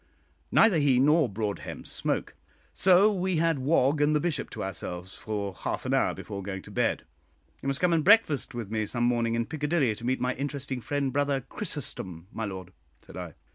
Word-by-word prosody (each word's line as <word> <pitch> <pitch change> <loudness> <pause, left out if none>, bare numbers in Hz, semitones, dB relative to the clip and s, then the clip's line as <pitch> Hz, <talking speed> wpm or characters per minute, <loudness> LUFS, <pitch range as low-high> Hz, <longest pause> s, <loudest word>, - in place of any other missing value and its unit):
Neither 215 -7 +5
he 135 -4 +4
nor 150 0 +4
Broadhem 105 0 -4
smoke, - - -2 0.4
so 190 +3 +5
we 185 -1 0
had 165 -2 +2
Wog 140 +1 +2
and 150 +1 +3
the - - +3
Bishop 165 0 -1
to - - -5
ourselves 90 0 -5
for 100 -3 -4
half - - -4
an - - 0
hour - - +2
before 100 -2 -6
going 95 -1 -5
to - - -12
bed. - - 0 0.6
"You - - -5
must 135 0 -1
come 180 -1 +3
and 160 -2 +2
breakfast 190 - +4
with 115 -4 -5
me 110 -1 -1
some 120 +2 -1
morning 120 -1 +2
in 115 0 0
Piccadilly 150 -4 0
to 105 - -11
meet 130 +2 0
my 125 0 0
interesting 135 -1 -4
friend 140 0 -1
Brother 140 -1 +1
Chrysostom, 115 - -5
my 110 - -3
lord," 95 -2 -7 0.3
said - - -13
I. 90 -4 -7
130 Hz, 195 wpm, -28 LUFS, 105-150 Hz, 0.6 s, Neither